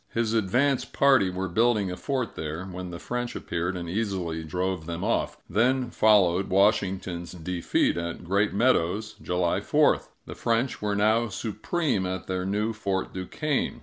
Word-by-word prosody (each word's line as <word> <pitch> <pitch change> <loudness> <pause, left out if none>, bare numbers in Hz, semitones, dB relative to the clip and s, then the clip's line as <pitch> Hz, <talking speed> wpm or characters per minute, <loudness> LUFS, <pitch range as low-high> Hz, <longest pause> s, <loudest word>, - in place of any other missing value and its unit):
His 115 -1 0
advance 125 +6 +2
party 135 -9 +3
were 95 +1 -3
building 105 0 +2
a - - -4
fort 125 +5 -2
there, 80 +4 -5
when 90 -1 -6
the 85 - -6
French 120 +5 -4
appeared 85 +2 -2
and 85 -1 -5
easily 90 -4 -2
drove 90 +1 -2
them 85 +1 -4
off. 115 - 0
Then 120 +5 +1
followed 95 -4 +4
Washington's 95 -3 +1
defeat 85 0 0
at 85 +1 -4
Great 100 +4 +1
Meadows 105 -2 +1
(July 90 -1 0
4). - - +3 0.2
The - - -7
French 115 +3 -1
were 105 -1 0
now 110 +3 +3
supreme 110 - -1
at 95 0 -4
their 95 0 -2
new 105 +3 0
Fort 100 -3 -2
Duquesne. 135 - -2
95 Hz, 155 wpm, -26 LUFS, 90-115 Hz, 0.2 s, followed